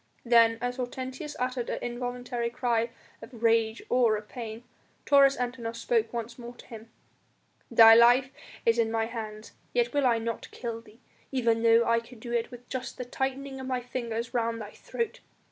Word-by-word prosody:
Then, 230 Hz, -1 st, +5 dB
as 245 Hz, +1 st, -2 dB
Hortensius 260 Hz, +4 st, -5 dB
uttered 250 Hz, -1 st, -2 dB
an -, -, -2 dB
involuntary 245 Hz, 0 st, -3 dB
cry 235 Hz, -1 st, 0 dB, 0.3 s
of 230 Hz, 0 st, -11 dB
rage 225 Hz, -1 st, +2 dB
or 235 Hz, -4 st, +3 dB
of 210 Hz, 0 st, -9 dB
pain, 230 Hz, -2 st, -7 dB, 0.4 s
Taurus 275 Hz, -1 st, +5 dB
Antinor 240 Hz, -2 st, -3 dB
spoke 230 Hz, -1 st, 0 dB
once 235 Hz, 0 st, -5 dB
more 240 Hz, 0 st, -9 dB
to -, -, -14 dB
him: 225 Hz, -1 st, -11 dB, 0.8 s
"Thy 225 Hz, -1 st, +9 dB
life 245 Hz, +3 st, +6 dB, 0.3 s
is 230 Hz, 0 st, +3 dB
in 225 Hz, -1 st, +2 dB
my 225 Hz, 0 st, +1 dB
hands 220 Hz, -2 st, -7 dB, 0.2 s
yet 240 Hz, 0 st, +1 dB
will 285 Hz, -2 st, +3 dB
I 235 Hz, -2 st, +3 dB
not 230 Hz, 0 st, -4 dB
kill 230 Hz, -2 st, -5 dB
thee, 225 Hz, +2 st, -20 dB, 0.3 s
even 230 Hz, -4 st, +1 dB
though 230 Hz, 0 st, +5 dB
I 230 Hz, 0 st, +3 dB
could 230 Hz, 0 st, -14 dB
do 235 Hz, +1 st, -8 dB
it 235 Hz, -1 st, 0 dB
with 245 Hz, 0 st, -12 dB
just 260 Hz, -1 st, -5 dB
the 250 Hz, -, -5 dB
tightening 265 Hz, +2 st, -3 dB
of 260 Hz, -, -6 dB
my 255 Hz, -1 st, -1 dB
fingers 235 Hz, -2 st, -4 dB
round 230 Hz, -1 st, 0 dB
thy 210 Hz, -1 st, -7 dB
throat. 460 Hz, -2 st, -4 dB
235 Hz, 180 wpm, -28 LUFS, 230-250 Hz, 0.8 s, Thy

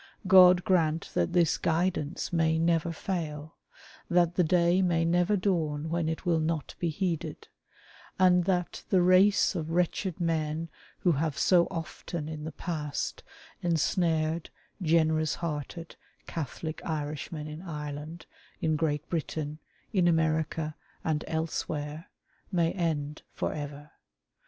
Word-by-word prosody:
God 180 Hz, -1 st, +8 dB
grant 165 Hz, -3 st, +1 dB
that -, -, +1 dB
this 170 Hz, -3 st, +3 dB
guidance 170 Hz, -1 st, -1 dB
may 160 Hz, -1 st, +2 dB
never 165 Hz, 0 st, +2 dB
fail; 160 Hz, -4 st, -4 dB, 0.5 s
that 175 Hz, -1 st, +3 dB
the 180 Hz, -, +3 dB
day 175 Hz, +2 st, +3 dB
may 170 Hz, -3 st, +2 dB
never 175 Hz, +4 st, +2 dB
dawn 160 Hz, -5 st, 0 dB
when 165 Hz, -1 st, 0 dB
it 160 Hz, +3 st, -4 dB
will 170 Hz, -2 st, +3 dB
not 160 Hz, -1 st, -2 dB
be 170 Hz, -, 0 dB
heeded; 170 Hz, 0 st, -3 dB, 0.7 s
and 180 Hz, -1 st, +5 dB
that 180 Hz, -2 st, -1 dB
the 185 Hz, -3 st, +4 dB
race 185 Hz, +4 st, +5 dB
of 160 Hz, -4 st, -3 dB
wretched 180 Hz, +2 st, 0 dB
men 165 Hz, -1 st, -1 dB, 0.3 s
who 180 Hz, -, +4 dB
have 155 Hz, -1 st, -1 dB
so 175 Hz, -2 st, +4 dB
often 165 Hz, -2 st, -5 dB
in 155 Hz, -1 st, -6 dB
the 160 Hz, -, -4 dB
past 150 Hz, -2 st, -4 dB, 0.4 s
ensnared 165 Hz, -1 st, +1 dB, 0.3 s
generous 160 Hz, -2 st, +2 dB
hearted, 165 Hz, +1 st, -5 dB, 0.3 s
Catholic 160 Hz, +1 st, -5 dB
Irishmen 150 Hz, 0 st, -4 dB
in 155 Hz, +2 st, -7 dB
Ireland, 150 Hz, -1 st, -6 dB, 0.3 s
in 160 Hz, -1 st, +1 dB
Great 150 Hz, -1 st, -1 dB
Britain, 155 Hz, -2 st, -3 dB, 0.3 s
in 180 Hz, -4 st, +3 dB
America, 160 Hz, -1 st, +1 dB, 0.3 s
and 155 Hz, -1 st, 0 dB
elsewhere, 160 Hz, 0 st, -3 dB, 0.4 s
may 170 Hz, -3 st, +2 dB
end 155 Hz, -5 st, -2 dB
for -, -, -1 dB
ever. 145 Hz, 0 st, -7 dB
165 Hz, 125 wpm, -29 LUFS, 155-175 Hz, 0.7 s, God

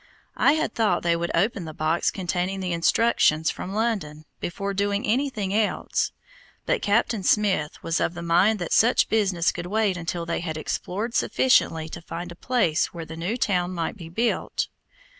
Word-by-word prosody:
I 280 Hz, -, +5 dB
had 315 Hz, -, -1 dB
thought 210 Hz, -6 st, +1 dB
they 170 Hz, 0 st, +2 dB
would 170 Hz, +1 st, -2 dB
open 195 Hz, +1 st, +1 dB
the 155 Hz, -1 st, -8 dB
box 155 Hz, +2 st, +1 dB
containing 185 Hz, +1 st, -2 dB
the 180 Hz, -2 st, -2 dB
instructions 165 Hz, -3 st, +3 dB
from 185 Hz, -, -6 dB
London, 195 Hz, -9 st, -2 dB
before 200 Hz, +3 st, -3 dB
doing 200 Hz, +1 st, 0 dB
anything 220 Hz, -5 st, 0 dB
else; 215 Hz, 0 st, 0 dB, 0.5 s
but -, -, +1 dB
Captain 220 Hz, +1 st, +1 dB
Smith 185 Hz, -6 st, +1 dB
was 165 Hz, +1 st, 0 dB
of 170 Hz, -, -1 dB
the 170 Hz, -, -6 dB
mind 180 Hz, +6 st, +3 dB
that 175 Hz, -4 st, -3 dB
such 235 Hz, +3 st, +4 dB
business 190 Hz, -6 st, +2 dB
could 175 Hz, -, -6 dB
wait 205 Hz, -1 st, +1 dB
until 170 Hz, 0 st, -3 dB
they 170 Hz, -, -2 dB
had 160 Hz, -2 st, -4 dB
explored 205 Hz, +8 st, -3 dB
sufficiently 165 Hz, -14 st, +2 dB
to 170 Hz, -, -8 dB
find 175 Hz, +1 st, -6 dB
a -, -, -9 dB
place 210 Hz, -7 st, +1 dB
where 170 Hz, -2 st, -8 dB
the 160 Hz, -, -8 dB
new 175 Hz, +9 st, -2 dB
town 185 Hz, -5 st, 0 dB
might 165 Hz, +3 st, -2 dB
be 170 Hz, -5 st, -10 dB
built. 230 Hz, +7 st, -1 dB
185 Hz, 180 wpm, -25 LUFS, 170-215 Hz, 0.5 s, I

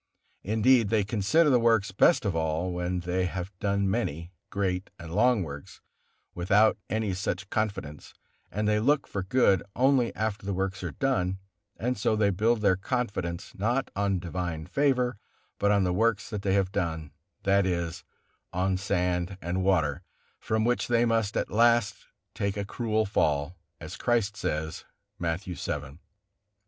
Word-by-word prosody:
Indeed, 110 Hz, +2 st, +3 dB
they 110 Hz, -1 st, +2 dB
consider 115 Hz, +10 st, +2 dB
the 125 Hz, -, +5 dB
works 115 Hz, -4 st, +3 dB
best 110 Hz, -, +4 dB
of 95 Hz, -4 st, 0 dB
all, 80 Hz, +2 st, -1 dB
when 90 Hz, 0 st, -2 dB
they 90 Hz, +1 st, 0 dB
have 90 Hz, +1 st, -5 dB
done 100 Hz, -1 st, +1 dB
many, 85 Hz, -6 st, -2 dB, 0.2 s
great 95 Hz, -2 st, -2 dB
and 85 Hz, -1 st, -9 dB
long 115 Hz, 0 st, +3 dB
works 70 Hz, -3 st, -9 dB, 0.5 s
without 100 Hz, +5 st, +3 dB
any 110 Hz, -1 st, -1 dB
such 95 Hz, 0 st, -3 dB
confidence, 100 Hz, -9 st, -3 dB, 0.3 s
and 105 Hz, +1 st, -2 dB
they 105 Hz, 0 st, +3 dB
look 140 Hz, +6 st, +2 dB
for 100 Hz, -, -4 dB
good 95 Hz, -2 st, +3 dB
only 130 Hz, -1 st, +3 dB
after 110 Hz, -2 st, -2 dB
the 100 Hz, -1 st, -2 dB
works 95 Hz, 0 st, -2 dB
are -, -, -3 dB
done; 95 Hz, -9 st, 0 dB, 0.4 s
and 125 Hz, +1 st, -2 dB
so 110 Hz, +2 st, +2 dB
they 105 Hz, -2 st, +2 dB
build 110 Hz, +4 st, +1 dB
their 95 Hz, -3 st, +4 dB
confidence 95 Hz, -6 st, -3 dB
not 120 Hz, +7 st, -1 dB
on 100 Hz, -1 st, +1 dB
divine 85 Hz, -2 st, -4 dB
favor, 125 Hz, -, +1 dB, 0.4 s
but 100 Hz, -, +2 dB
on 100 Hz, -1 st, +3 dB
the 90 Hz, -1 st, +1 dB
works 110 Hz, +2 st, +1 dB
they 100 Hz, -2 st, -1 dB
have 95 Hz, -2 st, +1 dB
done, 80 Hz, -5 st, -2 dB, 0.3 s
that 100 Hz, 0 st, +3 dB
is, 85 Hz, -2 st, -2 dB, 0.5 s
on 95 Hz, +1 st, 0 dB
sand 90 Hz, -1 st, -1 dB
and 90 Hz, +2 st, -2 dB
water, 80 Hz, -5 st, +1 dB, 0.4 s
from 110 Hz, 0 st, 0 dB
which 120 Hz, +1 st, +1 dB
they 120 Hz, 0 st, +3 dB
must 115 Hz, -3 st, +1 dB
at -, -, -2 dB
last 115 Hz, -1 st, +2 dB, 0.3 s
take 100 Hz, 0 st, -2 dB
a 100 Hz, -, -2 dB
cruel 110 Hz, +1 st, -1 dB
fall, 75 Hz, -5 st, 0 dB, 0.2 s
as 80 Hz, +1 st, -8 dB
Christ 115 Hz, -4 st, +1 dB
says, 80 Hz, -6 st, -3 dB, 0.4 s
Matthew 85 Hz, +2 st, -2 dB
vii. 75 Hz, -1 st, -5 dB
100 Hz, 155 wpm, -28 LUFS, 90-110 Hz, 0.5 s, the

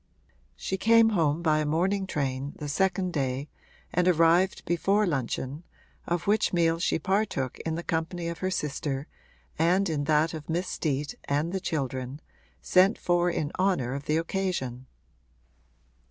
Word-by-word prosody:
She 190 Hz, -, -3 dB
came 225 Hz, +2 st, +5 dB
home 165 Hz, -5 st, +1 dB
by 155 Hz, -2 st, +3 dB
a 155 Hz, -, 0 dB
morning 190 Hz, +5 st, +1 dB
train, 140 Hz, -3 st, -2 dB
the 150 Hz, -, -6 dB
second 185 Hz, +3 st, 0 dB
day, 135 Hz, 0 st, -2 dB, 0.4 s
and 180 Hz, +1 st, +2 dB
arrived 175 Hz, +2 st, +3 dB
before 195 Hz, +5 st, +2 dB
luncheon, 135 Hz, -1 st, -2 dB, 0.4 s
of 175 Hz, -1 st, -1 dB
which 210 Hz, +2 st, +2 dB
meal 165 Hz, -2 st, +2 dB
she 175 Hz, -, +1 dB
partook 190 Hz, -, -1 dB
in 160 Hz, -, -1 dB
the 170 Hz, -, -4 dB
company 170 Hz, +1 st, -2 dB
of 170 Hz, -1 st, -4 dB
her 185 Hz, -, -1 dB
sister 145 Hz, -5 st, -2 dB, 0.5 s
and 180 Hz, +4 st, +3 dB
in 150 Hz, -4 st, -1 dB
that 155 Hz, +2 st, +2 dB
of 155 Hz, -1 st, -8 dB
Miss 175 Hz, +3 st, -1 dB
Steet 145 Hz, -4 st, -2 dB
and 150 Hz, +5 st, 0 dB
the 190 Hz, -, 0 dB
children, 135 Hz, -5 st, -3 dB, 0.4 s
sent 190 Hz, +4 st, +4 dB
for 175 Hz, 0 st, +2 dB
in 155 Hz, -3 st, -2 dB
honour 180 Hz, -10 st, +1 dB
of 140 Hz, +1 st, -5 dB
the 155 Hz, -, +1 dB
occasion. 165 Hz, -8 st, -2 dB
165 Hz, 155 wpm, -27 LUFS, 145-185 Hz, 0.5 s, came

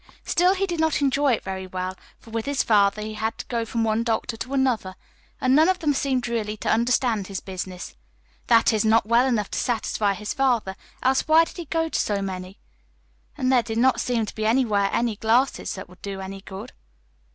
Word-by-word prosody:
Still, 360 Hz, +2 st, +3 dB
he 390 Hz, +1 st, 0 dB
did 345 Hz, -4 st, -4 dB
not 320 Hz, -1 st, +2 dB
enjoy 280 Hz, -1 st, +2 dB
it -, -, -2 dB
very 190 Hz, -1 st, -5 dB
well, 185 Hz, 0 st, -4 dB, 0.2 s
for 225 Hz, -, -16 dB
with 225 Hz, +1 st, -3 dB
his 285 Hz, -2 st, +1 dB
father 205 Hz, -1 st, +3 dB
he 215 Hz, 0 st, -5 dB
had 220 Hz, +1 st, -3 dB
to -, -, -7 dB
go 235 Hz, -2 st, -2 dB
from 225 Hz, +1 st, -1 dB
one 220 Hz, 0 st, +1 dB
doctor 230 Hz, 0 st, -1 dB
to 250 Hz, +4 st, -6 dB
another, 235 Hz, -8 st, 0 dB, 0.4 s
and 255 Hz, +1 st, +3 dB
none 315 Hz, +4 st, +5 dB
of 375 Hz, -, +2 dB
them 300 Hz, -5 st, +1 dB
seemed 265 Hz, -3 st, 0 dB
really 215 Hz, -3 st, -2 dB
to -, -, -1 dB
understand 235 Hz, -3 st, +1 dB
his 195 Hz, -2 st, -4 dB
business 185 Hz, -1 st, -7 dB, 0.5 s
that 230 Hz, -1 st, +5 dB
is, 215 Hz, -, +1 dB
not 220 Hz, -1 st, +3 dB
well 235 Hz, +4 st, +3 dB
enough 220 Hz, -6 st, -1 dB
to -, -, -2 dB
satisfy 220 Hz, -4 st, 0 dB
his 210 Hz, +1 st, -4 dB
father, 240 Hz, -8 st, +1 dB, 0.3 s
else 260 Hz, +3 st, +2 dB
why 320 Hz, +1 st, +6 dB
did -, -, -12 dB
he 345 Hz, -, -5 dB
go 325 Hz, +2 st, 0 dB
to -, -, -2 dB
so 205 Hz, -1 st, 0 dB
many? 185 Hz, -1 st, -5 dB, 0.8 s
And 255 Hz, 0 st, +1 dB
there 255 Hz, -2 st, +5 dB
did 225 Hz, -1 st, -5 dB
not 260 Hz, +2 st, +3 dB
seem 235 Hz, -3 st, 0 dB
to -, -, -8 dB
be 215 Hz, 0 st, -2 dB
anywhere 220 Hz, -5 st, +2 dB
any 235 Hz, -3 st, 0 dB
glasses 235 Hz, +5 st, +1 dB
that 190 Hz, -, -8 dB
would 180 Hz, +1 st, -18 dB
do 195 Hz, -1 st, -5 dB
any 190 Hz, 0 st, -7 dB
good. 190 Hz, 0 st, -9 dB
225 Hz, 220 wpm, -24 LUFS, 200-260 Hz, 0.8 s, why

